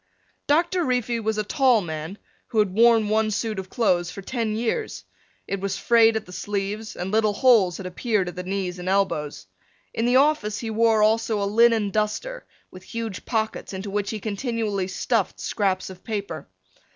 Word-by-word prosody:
Doctor 345 +4 +2
Reefy 245 -4 0
was 220 -1 -1
a 215 - 0
tall 250 +2 +3
man 160 +1 -5 0.3
who 225 - -5
had 210 -3 +3
worn 225 0 +5
one 215 +1 +2
suit 215 0 -2
of 190 -1 -7
clothes 180 -8 +1
for 195 +2 -8
ten 225 -1 -2
years. 240 - -2 0.4
It 195 - -2
was 195 0 -2
frayed 225 -1 +4
at 220 - -2
the 180 - -13
sleeves 205 +3 -4
and 180 +2 -4
little 215 -1 +2
holes 205 -7 +4
had 190 - -8
appeared 195 +1 -1
at 175 - -6
the 180 - -4
knees 185 -1 -3
and 180 +1 -4
elbows. 150 - -1 0.5
In 225 +1 0
the 245 - +3
office 265 -7 +3
he 225 -2 -4
wore 220 -1 +3
also 220 0 +2
a 200 - 0
linen 220 0 +3
duster 215 - -2 0.2
with 185 - -11
huge 225 0 -6
pockets 220 -3 -2
into 195 +1 -5
which 205 0 -1
he 220 - -4
continually 210 -2 -2
stuffed 210 +2 -1
scraps 190 -3 -1
of 180 -1 -13
paper. 200 - -5
215 Hz, 185 wpm, -24 LUFS, 195-230 Hz, 0.5 s, worn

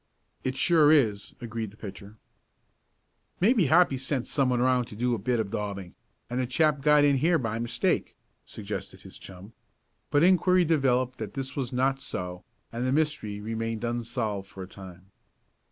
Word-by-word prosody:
"It 130 0 -2
sure 155 -4 +5
is," 110 -10 +2
agreed 115 -2 -4
the 105 - -18
pitcher. 100 +1 -10 1.2
"Maybe 205 - +4
Hoppy 160 -3 +4
sent 130 -1 -1
someone 125 -4 +1
around 125 0 +2
to 110 - -11
do 120 +3 0
a 115 - -1
bit 120 +4 0
of 105 -3 -2
daubing, 100 -3 -4 0.3
and 125 +2 -3
the 130 - 0
chap 150 +2 +2
got 150 0 +5
in 140 -1 +4
here 165 +5 +3
by 115 -5 -3
mistake," 120 0 -1 0.3
suggested - - -7
his - - -11
chum. 95 +3 -11 0.6
But 145 +2 +3
inquiry 180 0 +4
developed 130 -5 +1
that 105 -3 -6
this 135 -1 -4
was 130 -3 -3
not 135 +1 +1
so, 90 -7 -5 0.3
and 120 +2 -2
the - - +1
mystery 140 -9 -1
remained 115 +1 -4
unsolved 115 -4 -3
for 95 - -8
a - - -9
time. 95 0 -13
125 Hz, 170 wpm, -27 LUFS, 105-140 Hz, 1.2 s, sure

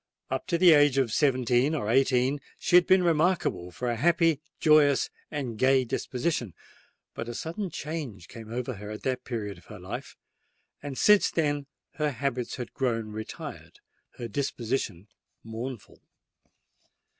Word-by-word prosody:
Up - - -2
to 170 - +1
the 175 0 +7
age 145 -3 +5
of 125 -5 +1
seventeen 130 0 +2
or 130 -9 -2
eighteen 130 +3 +2 0.2
she - - +1
had 180 -1 +7
been 185 -1 +5
remarkable 165 - +1
for 125 +7 -5
a 120 - 0
happy, 165 +2 +3 0.2
joyous, 150 -3 +4 0.2
and 130 -8 -4
gay 130 0 +4
disposition: 125 - -2 0.6
but 115 - -5
a 120 - -5
sudden 180 +4 -4
change 145 - -6
came 110 -1 -10
over 125 +2 -3
her 105 -1 -8
at 105 0 -7
that 130 -1 -1
period 105 -6 -4
of - - -22
her 105 - -10
life; 90 0 -7 0.6
and 140 -2 -6
since 210 -1 +5
then 145 -3 -1 0.3
her 150 -1 +1
habits 125 -2 -3
had 125 -2 -7
grown 115 -5 -1
retired—her 110 +2 -9
disposition 115 -6 -3 0.4
mournful. 115 0 -7
130 Hz, 145 wpm, -28 LUFS, 115-150 Hz, 0.6 s, the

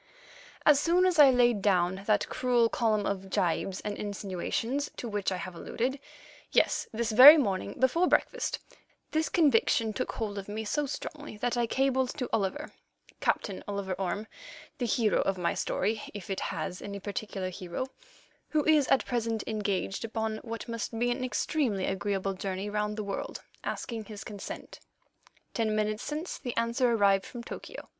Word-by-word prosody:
As 295 -2 +7
soon 345 +4 +3
as 360 -4 +2
I 285 -2 +10
laid 240 -4 +4
down 190 -1 +2
that 210 -2 +2
cruel 245 -2 +2
column 215 -4 +1
of 195 -1 -3
gibes 185 +1 0
and 205 -1 -3
insinuations 205 +7 -2
to 240 - -4
which 205 -3 -1
I 185 - -1
have 180 +1 -6
alluded—yes, 260 +10 -2
this 230 0 -1
very 265 +8 +11
morning, 200 -10 -1
before 295 +8 +3
breakfast, - - +1 0.5
this 315 0 +1
conviction 230 -7 +3
took - - -3
hold 205 -3 -3
of 195 - -9
me 220 +1 -4
so 295 +7 0
strongly 290 -3 -6
that 245 +3 -1
I 240 -1 +1
cabled 265 +1 +1
to 250 -4 -2
Oliver, 225 +9 -1 0.5
Captain 195 -4 -1
Oliver 200 -2 -2
Orme, 195 +3 -2 0.5
the 245 - 0
hero 225 -2 +2
of 195 -1 0
my 175 -1 0
history, 215 +3 -1
if 200 -1 -6
it 190 - -1
has 180 - -4
any 200 0 -6
particular 200 -2 -4
hero, 180 +7 -4 0.6
who 305 -2 +1
is 305 -4 +4
at 270 - +3
present 230 -3 -1
engaged 205 -2 -2
upon 220 -1 -2
what 230 +1 -7
must 230 -1 -4
be 240 +1 +1
an 255 +1 -2
extremely 250 -5 0
agreeable 195 0 -1
journey 195 +1 -4
round 210 0 -1
the 215 - -2
world—asking 215 +2 -5
his 210 -1 -8
consent. 205 -2 -8 0.7
Ten 220 -3 0
minutes 215 +1 0
since 305 +6 -4
the 245 -5 -5
answer 235 +2 +2
arrived 200 -3 +3
from 240 -1 -8
Tokyo. - - -8
220 Hz, 165 wpm, -29 LUFS, 200-250 Hz, 0.7 s, very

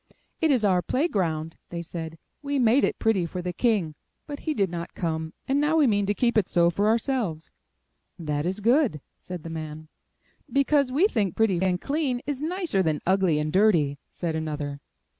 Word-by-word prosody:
'Tt 320 - +3
is 250 -7 +3
our 185 -3 +3
play 270 - 0
ground!" 165 - -2
they 170 -1 -5
said. 165 -1 -6 0.3
''We 285 -1 -1
made 245 +3 +4
it - - +1
pretty 205 -6 +1
for 180 - -6
the 180 0 -3
King, 200 -7 +1 0.3
but 285 -1 -7
he 305 - 0
did 195 -6 +1
not 170 0 -6
come, 160 -2 -2 0.2
and 275 +2 +2
now 305 +2 +2
we 305 - +5
mean 205 -4 +2
to 205 - +1
keep 235 -1 +3
it 195 - -2
so 170 0 +3
for 200 +5 +1
ourselves. 220 - 0 0.7
'That 150 -2 -2
is 190 +3 -2
good!" 235 - +3 0.2
said 180 -3 -8
the 165 - -7
man. 155 -1 -7 0.6
"Because 280 -1 +2
we 300 +9 +3
think 205 - -1
pretty 195 -6 +2
and 185 -1 +1
clean 275 -2 -1
is 285 -1 -3
nicer 330 - 0
than 155 -4 0
ugly 185 -4 +3
and 150 0 -2
dirty!" 170 -9 +3
said 165 -3 -3
another. 150 -3 -4
190 Hz, 195 wpm, -26 LUFS, 165-255 Hz, 0.7 s, we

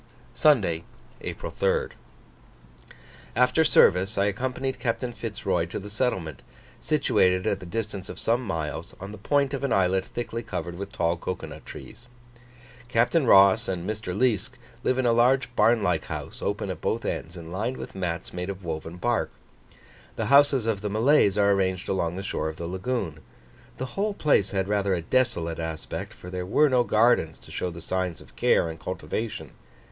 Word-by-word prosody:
Sunday, 100 - +3 0.4
April - - -5
3rd. - - 0 1.4
After 125 +6 +4
service 95 - +4
I 100 - +3
accompanied 130 +5 -2
Captain 120 0 -2
Fitz 110 -2 -7
Roy - - +1
to - - -5
the 105 +1 -7
settlement, 95 - -2 0.4
situated 95 -11 +2
at - - 0
the 90 - -9
distance 105 -1 -4
of - - -7
some 115 +2 +1
miles, 80 -8 -4
on 100 +2 -7
the 105 - -9
point 140 +5 +1
of 140 - -3
an 140 - 0
islet 95 -1 +3
thickly 115 +2 -5
covered 90 -5 -5
with 100 +2 -6
tall 85 -4 0
cocoa 90 +2 -4
nut - - -10
trees. 125 - -11 0.8
Captain 125 +5 +2
Ross 100 +2 +6
and 90 -1 -3
Mr. 105 -3 -3
Liesk 120 -1 +1 0.3
live 130 - +1
in 130 - +1
a 120 - +4
large 125 +1 +3
barn 110 0 +4
like 85 -5 +1
house - - -6
open - - -2
at - - -7
both - - -1
ends, 85 +3 -4
and 85 -1 -9
lined 110 +8 -2
with - - -8
mats 90 -3 -4
made 90 +1 -4
of 95 -2 -6
woven 80 +1 -5
bark. 120 +5 0 0.9
The - - -2
houses 140 -4 +6
of 110 -4 0
the 105 - -2
Malays 110 -1 +4
are 100 0 +4
arranged 95 -2 0
along 85 -3 -1
the 95 - -5
shore 80 - -2
of 80 - -7
the 85 - -5
lagoon. 95 -2 -3 0.6
The 130 - -3
whole 205 +1 -1
place 145 - +3
had 95 -1 -1
rather 100 -2 +1
a 85 - -2
desolate 85 -8 0
aspect, 80 -1 -5
for 90 - -10
there 90 -1 -3
were 150 +11 +3
no 125 -2 +4
gardens 110 -8 +3
to - - -15
show 90 - -2
the 85 -1 -9
signs 90 -1 -2
of - - -17
care - - +3
and 80 0 -7
cultivation. 105 +4 -4
100 Hz, 185 wpm, -26 LUFS, 90-120 Hz, 1.4 s, Ross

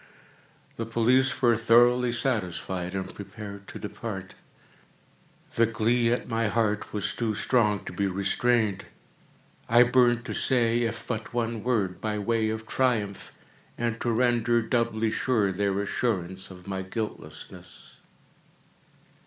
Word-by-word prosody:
The 115 - -2
police 130 +5 +2
were 120 -1 +5
thoroughly 120 +2 +4
satisfied 95 -7 -2
and 95 -1 -4
prepared 100 -1 -9
to - - -8
depart. 105 -3 -6 1.2
The 115 0 +3
glee 115 +1 +2
at 120 - -1
my 115 -1 0
heart 105 -1 0
was 105 -4 -2
too 110 -3 -1
strong 105 -4 +1
to - - -6
be 100 +2 0
restrained. 100 +2 +1 0.8
I 120 +1 +7
burned 125 -1 +3
to 110 - -4
say 120 0 +2
if 115 -1 -2
but 115 0 -5
one 115 -2 -1
word, 105 -7 0
by 105 -1 -1
way 110 +1 0
of 110 0 -4
triumph, 110 -5 -1 0.5
and 115 -1 -2
to 120 - 0
render 120 0 +2
doubly 115 -2 0
sure 110 -7 +1
their 100 +1 0
assurance 95 -3 -2
of 90 -1 -12
my 95 -1 -3
guiltlessness. 105 +3 -7
115 Hz, 130 wpm, -27 LUFS, 100-120 Hz, 1.2 s, I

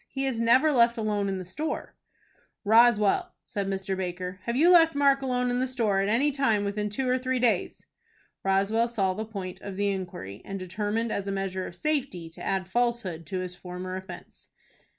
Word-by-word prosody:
He 270 0 -2
is 245 -4 -1
never 255 +7 +5
left 235 -3 +4
alone 210 -2 0
in 190 - -2
the 185 - -6
store." 295 - -4 0.7
"Roswell," 220 -1 +4
said 200 -1 -4
Mr. 195 0 -2
Baker, 180 0 -4
"have 235 - -1
you 330 +7 +5
left 330 -3 +6
Mark 280 -1 +4
alone 250 -1 0
in 245 - 0
the 260 - 0
store 225 -6 +1
at 200 - 0
any 265 +7 +3
time 225 -7 +1
within 210 +1 -2
two 255 +5 -2
or 255 +1 +2
three 255 0 -1
days?" 235 -7 0 0.6
Roswell 195 +4 +2
saw 200 -6 0
the 215 +3 -4
point 195 -4 -7
of 195 -2 -7
the 205 0 +1
inquiry, 175 - -5
and 195 - -5
determined, 210 +5 -2
as 200 0 -3
a - - -1
measure 195 -1 -3
of 170 - -10
safety, 250 - -2
to - - -11
add 190 -1 -1
falsehood 220 -7 -1
to 185 -1 -3
his 180 -1 -6
former 180 +1 -6
offence. 190 +1 -10
210 Hz, 195 wpm, -27 LUFS, 190-245 Hz, 0.7 s, left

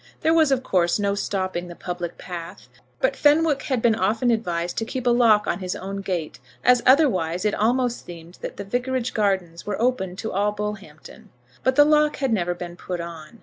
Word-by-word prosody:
There 320 - +3
was, 320 -3 +4
of 260 -1 +1
course, 175 -6 +2
no 200 -1 0
stopping 185 -3 -2
the 175 - -9
public 175 -1 -5
path, 175 +1 -8 0.3
but - - +2
Fenwick 295 -1 +3
had 255 -5 -2
been 235 - +5
often 220 +4 +1
advised 175 -6 -1
to - - -2
keep 255 +2 -5
a 245 - +4
lock 230 -3 +4
on - - -1
his 185 -1 -3
own 195 +1 -5
gate, 180 -5 -4 0.2
as 250 -1 +5
otherwise 190 - +3
it 210 - +2
almost 245 +2 0
seemed 170 0 -12
that - - -6
the - - -5
vicarage 250 +3 -2
gardens 190 -5 -1
were 205 - -2
open 225 -7 0
to 220 +3 -5
all 205 +2 0
Bullhampton. 210 -1 -7 0.3
But 260 0 +2
the 290 +1 +7
lock 300 0 +3
had 270 -4 -1
never 175 -4 0
been 175 -1 -7
put 180 -1 -5
on. 170 +4 -9
210 Hz, 200 wpm, -23 LUFS, 180-250 Hz, 0.3 s, the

